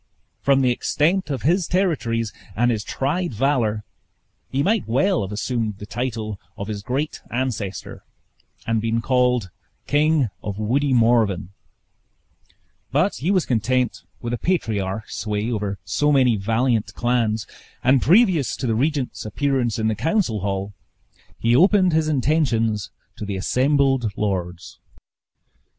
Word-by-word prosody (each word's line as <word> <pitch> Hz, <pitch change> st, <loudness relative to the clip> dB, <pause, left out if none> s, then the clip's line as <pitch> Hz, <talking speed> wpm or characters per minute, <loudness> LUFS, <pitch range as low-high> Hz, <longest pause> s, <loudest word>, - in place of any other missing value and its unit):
From 135 Hz, -1 st, +3 dB
the 125 Hz, -2 st, +3 dB
extent 165 Hz, +8 st, +1 dB
of 135 Hz, -5 st, -3 dB
his 175 Hz, +3 st, +2 dB
territories 125 Hz, -, 0 dB, 0.2 s
and 120 Hz, +2 st, +2 dB
his 110 Hz, -2 st, -2 dB
tried 145 Hz, +4 st, -2 dB
valor, 115 Hz, -4 st, +1 dB, 0.7 s
he 135 Hz, +2 st, 0 dB
might 215 Hz, -, +1 dB
well 145 Hz, -, +2 dB
have 95 Hz, -, -4 dB
assumed 110 Hz, -1 st, -2 dB
the 105 Hz, -, -8 dB
title 110 Hz, -4 st, -4 dB, 0.2 s
of 100 Hz, -1 st, -5 dB
his 105 Hz, -2 st, -4 dB
great 135 Hz, +8 st, -3 dB
ancestor, 120 Hz, -6 st, -4 dB, 0.6 s
and 115 Hz, -1 st, 0 dB
been 115 Hz, +1 st, 0 dB
called 125 Hz, -5 st, +1 dB, 0.3 s
King 150 Hz, -3 st, +2 dB
of 100 Hz, -2 st, -5 dB
Woody 130 Hz, +7 st, +1 dB
Morven, 115 Hz, -7 st, +3 dB, 1.4 s
but 155 Hz, +9 st, +1 dB
he 155 Hz, -, -2 dB
was 185 Hz, -5 st, +2 dB
content 125 Hz, +1 st, 0 dB, 0.2 s
with 120 Hz, 0 st, -3 dB
a 120 Hz, -, -2 dB
patriarch's 110 Hz, -, -2 dB
sway 105 Hz, +2 st, -2 dB
over 105 Hz, -3 st, -2 dB
so 150 Hz, 0 st, +1 dB
many 130 Hz, -5 st, +4 dB
valiant 115 Hz, +2 st, 0 dB
clans; 115 Hz, -3 st, 0 dB, 0.4 s
and 130 Hz, +1 st, +4 dB
previous 175 Hz, -, +4 dB
to 135 Hz, -, -4 dB
the 115 Hz, -, +1 dB
regent's 140 Hz, +2 st, -1 dB
appearance 125 Hz, 0 st, 0 dB
in 110 Hz, -1 st, 0 dB
the 110 Hz, -, +2 dB
council 160 Hz, -, 0 dB
hall 100 Hz, +1 st, -3 dB, 0.6 s
he 115 Hz, +1 st, +2 dB
opened 185 Hz, +2 st, +5 dB
his 155 Hz, -1 st, +2 dB
intentions 125 Hz, -8 st, +1 dB, 0.3 s
to 110 Hz, -, -6 dB
the 100 Hz, -1 st, -3 dB
assembled 135 Hz, +1 st, +2 dB
lords. 90 Hz, -4 st, -3 dB
120 Hz, 135 wpm, -22 LUFS, 110-145 Hz, 1.4 s, opened